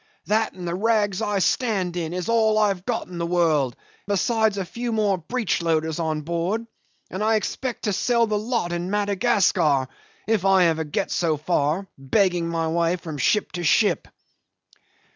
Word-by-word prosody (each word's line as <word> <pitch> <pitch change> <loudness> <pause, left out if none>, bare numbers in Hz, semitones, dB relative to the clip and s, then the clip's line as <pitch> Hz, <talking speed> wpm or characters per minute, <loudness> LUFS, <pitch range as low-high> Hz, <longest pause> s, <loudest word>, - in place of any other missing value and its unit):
That 220 +1 +1
and 180 -2 -7
the 170 - -2
rags 205 0 +1
I 205 -2 0
stand 195 -4 0
in 165 -2 -3
is 180 0 -4
all 220 -2 +3
I 210 -1 +4
have 190 -2 -4
got 240 -2 -1
in 175 -1 -8
the 170 - -1
world, 160 -7 +1 0.3
besides 215 +1 +1
a 195 - -2
few 235 +6 -4
more 210 -4 +1
breechloaders 165 -6 -1
on 155 -2 -1
board; 170 +8 -2 0.5
and 190 +3 -3
I 220 +1 +3
expect 245 +3 -3
to 210 - 0
sell 235 +4 +2
the 215 -1 -1
lot 215 -4 -1
in 175 +1 -3
Madagascar, 200 - +2 0.4
if 220 -4 +1
I 195 -1 +5
ever 160 -1 +1
get 150 - -2
so 160 -3 +1
far 155 +3 0
begging 175 +4 +1
my 165 -1 -1
way 170 +1 +1
from 160 -4 -7
ship 210 - +1
to 175 - -5
ship." 205 +6 +2
185 Hz, 175 wpm, -23 LUFS, 170-215 Hz, 0.5 s, I